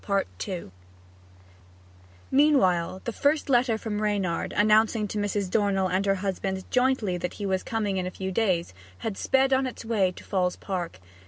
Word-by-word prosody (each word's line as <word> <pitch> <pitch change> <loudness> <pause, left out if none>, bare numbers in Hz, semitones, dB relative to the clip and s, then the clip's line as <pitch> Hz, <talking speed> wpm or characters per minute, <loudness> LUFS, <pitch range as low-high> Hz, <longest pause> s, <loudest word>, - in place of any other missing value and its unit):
Meanwhile 190 - +3
the 235 - -3
first 290 +2 +1
letter 240 -2 +3
from 215 -1 -3
Reynard, 200 -5 -1
announcing 215 +1 +4
to 210 - -3
Mrs. 205 -1 -1
Dornell 195 -3 +2
and 190 +2 0
her 195 - +3
husband 190 0 -3
jointly 250 -7 +2
that 180 - -3
he 205 - -5
was 190 -1 0
coming 210 -4 -2
in 180 -1 -1
a - - -2
few 190 +1 -5
days, 185 - 0 0.3
had 220 - -2
sped 265 +5 +2
on 265 0 +2
its 245 - -8
way 205 -5 +2
to - - -12
Falls 180 -2 0
Park. 175 - -5
205 Hz, 160 wpm, -26 LUFS, 185-225 Hz, 0.3 s, announcing